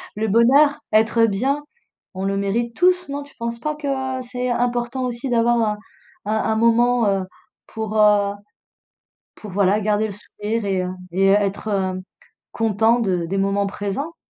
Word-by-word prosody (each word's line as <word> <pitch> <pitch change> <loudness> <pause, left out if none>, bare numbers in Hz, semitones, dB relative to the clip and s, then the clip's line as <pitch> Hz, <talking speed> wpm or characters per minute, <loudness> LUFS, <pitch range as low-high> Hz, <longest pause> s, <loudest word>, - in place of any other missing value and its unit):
le 220 +1 -1
bonheur, 265 +7 +5 0.2
être 225 +1 +4
bien, 265 +8 -1 0.5
on 190 - -4
le 195 0 0
mérite 230 +4 -1
tous, 360 0 +2
non? 285 +1 -4
Tu 285 - -18
penses 235 0 -4
pas 305 +5 -3
que, 300 -1 -6 0.3
heu, - - -4
c'est 250 0 -4
important 245 +1 -1
aussi 245 +2 -4
d'avoir 240 0 +2
un 210 -1 0 0.5
un 215 +1 0 0.2
un - - +1
moment, 235 +1 +3
heu, 195 -1 +1 0.4
pour, 220 -1 -4
heu, 205 -1 +4 1.0
pour 210 - -10
voilà, 200 +2 +2
garder 210 +1 +1
le 205 - -7
sourire 210 +2 -5
et 190 -2 0
heu, 180 - -3 0.2
et 190 +2 +2
être 200 +1 +1
hem 190 -2 -1 0.5
content 225 +1 +2
de 185 -6 0
des 195 +3 -2
moments 195 +1 +1
présents? 205 +12 -4
220 Hz, 170 wpm, -21 LUFS, 200-240 Hz, 1.0 s, bonheur